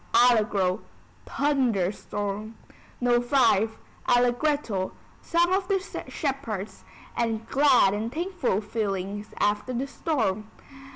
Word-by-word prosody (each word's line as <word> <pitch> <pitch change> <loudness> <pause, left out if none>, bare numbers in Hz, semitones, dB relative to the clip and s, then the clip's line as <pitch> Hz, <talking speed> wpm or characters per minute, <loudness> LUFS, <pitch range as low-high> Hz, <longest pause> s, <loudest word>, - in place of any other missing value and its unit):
Allegro: 210 -5 +4 0.5
Thunder 255 -10 +1
storm. 205 +2 -5 0.4
No. 245 -1 +3
V. 240 -4 +3 0.4
Allegretto: 245 -4 +1 0.3
Song 345 +2 +2
of 380 -1 +1
the 395 -1 +2 0.3
Shepherds, 265 - -4 0.3
and 225 -1 -1
glad 265 -8 +4
and 220 +3 -2
thankful 330 - -1
feelings 205 -1 -3
after 205 +5 0
the 250 +3 -1
storm. 220 - -1
230 Hz, 100 wpm, -26 LUFS, 205-275 Hz, 0.5 s, Allegro